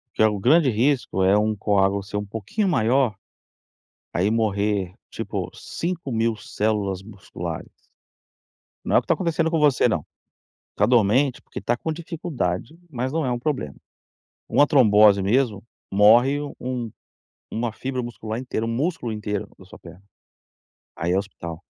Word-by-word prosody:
Que -, -, -1 dB
é -, -, +7 dB
o 105 Hz, -2 st, -2 dB
grande 145 Hz, -, +4 dB
risco 120 Hz, -5 st, +1 dB
é 95 Hz, +2 st, +5 dB
um 110 Hz, +1 st, +1 dB
coágulo 100 Hz, -1 st, +1 dB
ser 105 Hz, +1 st, -5 dB
um 105 Hz, -, -3 dB
pouquinho 110 Hz, -, -2 dB
maior, 125 Hz, -, +2 dB, 1.0 s
aí 95 Hz, +4 st, +1 dB
morrer, 100 Hz, -4 st, 0 dB, 0.2 s
tipo, -, -, -4 dB
5.000 130 Hz, -10 st, -2 dB
células 105 Hz, -3 st, -1 dB
musculares. 100 Hz, -1 st, -7 dB, 1.2 s
Não -, -, +2 dB
é -, -, +8 dB
o -, -, +4 dB
que -, -, -19 dB
tá -, -, +3 dB
acontecendo 165 Hz, -2 st, 0 dB
com 165 Hz, -1 st, +1 dB
você 145 Hz, -4 st, +4 dB
não. 85 Hz, -10 st, -1 dB, 0.7 s
Tá -, -, +3 dB
dormente, 125 Hz, +3 st, +3 dB
porque -, -, -8 dB
tá 120 Hz, -, 0 dB
com 160 Hz, -, -3 dB
dificuldade, 155 Hz, -, -4 dB
mas 130 Hz, -2 st, -3 dB
não 160 Hz, -2 st, 0 dB
é 125 Hz, -, 0 dB
um 120 Hz, -, -1 dB
problema. 140 Hz, +1 st, -2 dB, 0.7 s
Uma 145 Hz, -, +4 dB
trombose 105 Hz, -7 st, +5 dB
mesmo, 105 Hz, 0 st, +1 dB, 0.3 s
morre 115 Hz, +8 st, +5 dB
u 145 Hz, -1 st, -6 dB
um 125 Hz, -2 st, -3 dB, 0.6 s
uma 115 Hz, +1 st, -2 dB
fibra 130 Hz, +3 st, -4 dB
muscular 115 Hz, -1 st, -5 dB
inteira, 125 Hz, -3 st, -3 dB
um -, -, -2 dB
músculo 125 Hz, 0 st, -2 dB
inteiro 105 Hz, -1 st, -3 dB
da 95 Hz, -, -15 dB
sua -, -, -13 dB
perna. 90 Hz, +2 st, -14 dB, 1.0 s
Aí 85 Hz, +2 st, 0 dB
é -, -, +2 dB
hospital. 85 Hz, -4 st, -6 dB
115 Hz, 155 wpm, -23 LUFS, 100-135 Hz, 1.2 s, é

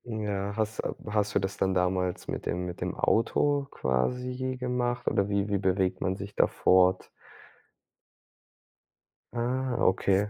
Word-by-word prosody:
Ja, 105 Hz, -3 st, -3 dB
hast 110 Hz, 0 st, -1 dB, 0.2 s
hast 105 Hz, -1 st, -1 dB
du -, -, +5 dB
das 95 Hz, 0 st, -3 dB
dann 95 Hz, 0 st, +1 dB
damals 90 Hz, 0 st, 0 dB
mit -, -, -4 dB
dem 90 Hz, +1 st, -1 dB
mit 90 Hz, -1 st, -7 dB
dem -, -, -2 dB
Auto 140 Hz, +5 st, +2 dB
quasi 125 Hz, -, -1 dB
gemacht 125 Hz, -1 st, -1 dB
oder 100 Hz, 0 st, +2 dB
wie 100 Hz, 0 st, +1 dB
wie 100 Hz, -1 st, 0 dB
bewegt 95 Hz, -1 st, +1 dB
man 95 Hz, 0 st, 0 dB
sich 100 Hz, +1 st, -8 dB
da -, -, +4 dB
fort? 95 Hz, 0 st, +3 dB, 2.3 s
Ah, 125 Hz, +2 st, -1 dB
okay, 95 Hz, +2 st, +2 dB
100 Hz, 140 wpm, -28 LUFS, 95-120 Hz, 2.3 s, du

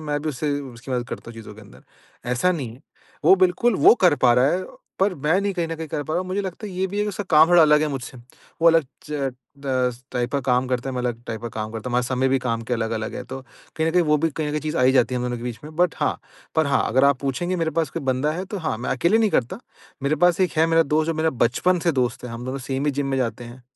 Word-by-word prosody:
मैं 145 Hz, 0 st, -1 dB
भी 155 Hz, -, -2 dB
उससे 145 Hz, +1 st, -2 dB
उसकी 130 Hz, -1 st, -10 dB
मदद 120 Hz, -1 st, -2 dB
करता -, -, -7 dB
हूँ -, -, -12 dB
चीज़ों 110 Hz, -2 st, -10 dB
के 110 Hz, -, -13 dB
अंदर। 105 Hz, -, -16 dB, 0.5 s
ऐसा 125 Hz, +9 st, +2 dB
नहीं 140 Hz, -9 st, -4 dB
है। 125 Hz, -, -18 dB, 0.4 s
वो -, -, +8 dB
बिल्कुल 225 Hz, +6 st, +1 dB
वो -, -, +7 dB
कर 175 Hz, -, +6 dB
पा 120 Hz, -, +7 dB
रहा 125 Hz, +2 st, +4 dB
है 185 Hz, +1 st, -1 dB, 0.4 s
पर 195 Hz, 0 st, +2 dB
मैं 155 Hz, +5 st, +1 dB
नहीं 200 Hz, 0 st, -1 dB
कहीं 170 Hz, -2 st, -2 dB
न 165 Hz, -, -3 dB
कहीं 160 Hz, 0 st, -5 dB
कर 145 Hz, -, -3 dB
पा 155 Hz, -, -4 dB
रहा -, -, +1 dB
हूँ। 185 Hz, -, -5 dB
मुझे 190 Hz, +2 st, -1 dB
लगता 190 Hz, +3 st, -6 dB
है 200 Hz, -, -8 dB
ये 185 Hz, +1 st, -1 dB
भी 195 Hz, +2 st, -6 dB
है -, -, +2 dB
कि -, -, -2 dB
उसका 205 Hz, 0 st, -4 dB
काम 160 Hz, 0 st, +7 dB
थोड़ा 175 Hz, -1 st, +7 dB
अलग 150 Hz, -1 st, +5 dB
है -, -, +1 dB
मुझसे। 135 Hz, -2 st, -6 dB, 0.4 s
वो 170 Hz, -, +8 dB
अलग 165 Hz, -1 st, +4 dB, 0.2 s
च 140 Hz, -3 st, -2 dB, 0.4 s
10 125 Hz, -2 st, 0 dB
टाइप 125 Hz, -1 st, -2 dB
का 140 Hz, -, +1 dB
काम 125 Hz, -1 st, +1 dB
करता 125 Hz, +1 st, -2 dB
है, -, -, -6 dB
मैं 125 Hz, -, -2 dB
अलग 120 Hz, -1 st, -3 dB
टाइप 110 Hz, -1 st, -5 dB
का 120 Hz, -, -3 dB
काम 110 Hz, -1 st, -5 dB
करता 115 Hz, +2 st, -5 dB
हूँ। -, -, -5 dB
हमारा 125 Hz, 0 st, +2 dB
समय 130 Hz, 0 st, +1 dB
भी 135 Hz, +1 st, +2 dB
काम 115 Hz, -2 st, -2 dB
के 125 Hz, -, +1 dB
अलग-अलग 110 Hz, -1 st, -3 dB
है। -, -, -5 dB
तो 130 Hz, +2 st, -7 dB, 0.4 s
कहीं 160 Hz, -, 0 dB
न -, -, -1 dB
कहीं 180 Hz, +1 st, +4 dB
वो 150 Hz, -2 st, +3 dB
भी 165 Hz, +2 st, +1 dB
कहीं 150 Hz, 0 st, -3 dB
न 150 Hz, -, 0 dB
चीज़ 155 Hz, +2 st, -4 dB
आ -, -, +2 dB
ही 130 Hz, +1 st, +5 dB
जाती 125 Hz, -1 st, +2 dB
है -, -, 0 dB
हम 125 Hz, -, -3 dB
दोनों 125 Hz, 0 st, -2 dB
के -, -, -9 dB
बीच 120 Hz, -2 st, -5 dB
में। 155 Hz, +1 st, -10 dB
बट 180 Hz, -1 st, +2 dB
हाँ -, -, 0 dB, 0.4 s
पर 160 Hz, -1 st, +2 dB
हाँ, 140 Hz, -, +2 dB
अगर 130 Hz, +4 st, +3 dB
आप 140 Hz, -1 st, +4 dB
पूछेंगे 160 Hz, +7 st, -2 dB
मेरे 165 Hz, -2 st, 0 dB
पास 155 Hz, -4 st, -2 dB
कोई -, -, -5 dB
बंदा 135 Hz, +3 st, 0 dB
है 180 Hz, +4 st, -4 dB
तो 200 Hz, +1 st, -6 dB
हाँ, 160 Hz, -9 st, -2 dB
मैं 125 Hz, -, -4 dB
अकेले 170 Hz, -, +2 dB
नहीं 220 Hz, -2 st, +2 dB
करता। 125 Hz, -, -1 dB, 0.4 s
मेरे 140 Hz, +3 st, +1 dB
पास 175 Hz, +2 st, +3 dB
एक 185 Hz, -, +2 dB
है 160 Hz, +1 st, +4 dB
मेरा 165 Hz, 0 st, +4 dB
दोस्त 155 Hz, +1 st, 0 dB
जो -, -, -2 dB
मेरा 160 Hz, +1 st, +1 dB
बचपन 180 Hz, +10 st, +1 dB
से -, -, +3 dB
दोस्त 125 Hz, -3 st, -1 dB
है 125 Hz, -, -6 dB
हम 115 Hz, +1 st, -7 dB
दोनों 130 Hz, +2 st, -4 dB
सेम 135 Hz, +1 st, -1 dB
ही -, -, +3 dB
जिम 140 Hz, -, -1 dB
में 135 Hz, -1 st, -1 dB
जाते 120 Hz, -1 st, -2 dB
हैं। 120 Hz, +2 st, -12 dB
140 Hz, 310 wpm, -23 LUFS, 125-165 Hz, 0.5 s, वो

